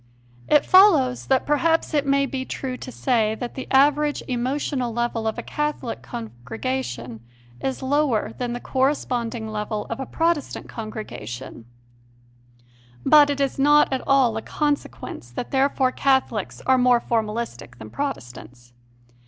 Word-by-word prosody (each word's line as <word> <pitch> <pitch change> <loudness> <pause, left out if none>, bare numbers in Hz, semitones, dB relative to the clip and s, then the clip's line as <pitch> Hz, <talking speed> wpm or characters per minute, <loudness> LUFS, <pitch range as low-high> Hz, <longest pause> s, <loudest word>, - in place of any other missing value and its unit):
It 295 - +4
follows 320 -11 +5
that 265 -1 +2
perhaps 325 +3 +1
it 290 -2 +1
may 275 0 +3
be 265 0 -4
true 260 -1 -5
to 255 - -8
say 225 -4 +1
that 240 +1 -6
the 260 - -6
average 290 +2 +3
emotional 255 0 -1
level 235 -1 -1
of 220 - -2
a - - -4
Catholic 295 - -3
congregation 120 0 -5 0.4
is 265 0 -3
lower 275 -4 +1
than 245 -1 -2
the 245 - -4
correspond 260 -3 -1
ing 220 -2 -5
level 210 0 -3
of 230 - -3
a 265 - -4
Protestant 330 -3 -1
congregation, 130 - -7 1.4
but 295 -1 +7
it 285 -1 -1
is 275 -1 -1
not 295 0 +5
at 260 - -1
all 265 -5 +4
a - - -3
consequence 290 - -3
that 120 - -6
therefore 265 -1 +2
Catholics 265 -7 0
are 260 0 +4
more 250 -1 +5
formalistic 220 - -3
than 110 -2 -10
Protestants. 120 - -6
250 Hz, 145 wpm, -23 LUFS, 215-280 Hz, 1.4 s, but